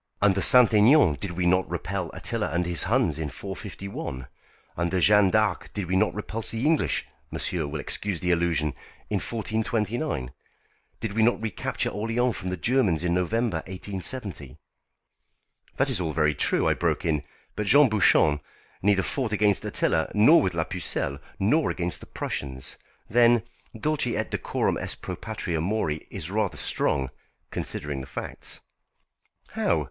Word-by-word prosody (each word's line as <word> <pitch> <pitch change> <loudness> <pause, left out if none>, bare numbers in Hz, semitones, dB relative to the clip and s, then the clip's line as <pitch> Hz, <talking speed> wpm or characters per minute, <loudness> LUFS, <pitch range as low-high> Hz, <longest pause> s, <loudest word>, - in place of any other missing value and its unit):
Under 100 -1 +3
S. 95 - +10
Aignan 115 - +6
did 95 -3 -4
we 90 0 -1
not 90 +1 +2
repel 90 0 -3
Attila - - -2
and 85 +2 -1
his 85 0 +3
Huns 100 - +1
in 75 -2 -3
451? 95 - -7 0.5
Under 85 +2 0
Jeanne 105 +1 +5
d'Arc 110 -2 0
did 100 -3 -2
we 90 +2 -1
not 95 - +2
repulse 110 +1 -5
the 115 +4 -3
English 160 -1 +1 0.2
monsieur 85 -5 -1
will 75 +1 -5
excuse 95 +5 -2
the 90 +2 0
allusion 85 -3 +1 0.4
in - - +2
1429. 110 - -2 0.7
Did 110 -3 -3
we 110 - +1
not 120 +2 +3
recapture 110 -3 -2
Orléans 115 +4 0
from 95 -2 -4
the 90 - -3
Germans 100 - +1
in 85 -1 +1
November, 105 +3 0
1870?" 95 - -5 1.2
"That - - +1
is - - 0
all 80 -3 -2
very 75 -1 +2
true," - - +1
I - - +4
broke - - -1
in. 75 -3 +1 0.3
"But 105 0 -3
Jean 145 +5 +7
Bouchon 85 -8 +4 0.4
neither 100 -1 +3
fought 125 0 -2
against 105 -1 +2
Attila 80 - 0
nor 130 +11 +7
with 95 -3 -1
la 80 - +1
Pucelle, 80 -5 -3 0.2
nor 145 +11 +2
against 90 -2 -3
the - - -13
Prussians. 65 -1 -4 0.3
Then 120 -1 +4 0.4
'Dulce 150 +2 +1
et 120 - -2
decorum - - -1
est - - -4
pro - - -4
patria 80 -2 -3
mori' 85 -5 -2
is 80 - -5
rather 105 -2 -1
strong, 65 -2 0 0.4
considering 75 -2 -4
the 65 - -9
facts." - - -4 0.9
"How? - - +1
95 Hz, 155 wpm, -26 LUFS, 85-110 Hz, 1.2 s, S